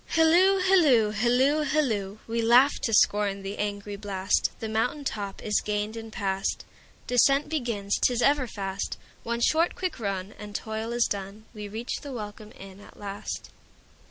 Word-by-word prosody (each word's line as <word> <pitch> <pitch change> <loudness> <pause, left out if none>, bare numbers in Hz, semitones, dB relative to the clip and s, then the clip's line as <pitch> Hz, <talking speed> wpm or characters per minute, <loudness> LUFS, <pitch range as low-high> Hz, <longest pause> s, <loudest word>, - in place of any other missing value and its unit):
Hilloo, 345 +4 +5
hilloo, 300 - +4
hilloo, 250 +7 +2
hilloo! 220 -10 0
We 230 +1 -1
laugh 245 +5 +6
to 225 - -1
scorn 205 -2 +3
the 195 +1 -6
angry 205 0 -3
blast, 195 -2 0
The 220 - -4
mountain 225 +7 -1
top 200 -7 -4
is 210 -1 +1
gained 210 +1 -2
and 225 -1 -8
past. 195 -1 -2 0.4
Descent 275 +3 +3
begins, 230 -10 -1
't - - +3
is 240 - 0
ever 280 -2 +3
fast—One 205 +3 -5
short 325 +7 +2
quick 365 -7 -3
run, 195 -2 -3
and 210 -1 -9
toil 220 +1 -4
is 240 0 +2
done, 200 +2 -5
We 210 -2 -7
reach 220 +4 -4
the 285 - -8
welcome 210 -2 -7
inn 195 0 -11
at 205 - -16
last. 200 0 -6
220 Hz, 160 wpm, -27 LUFS, 205-255 Hz, 0.4 s, laugh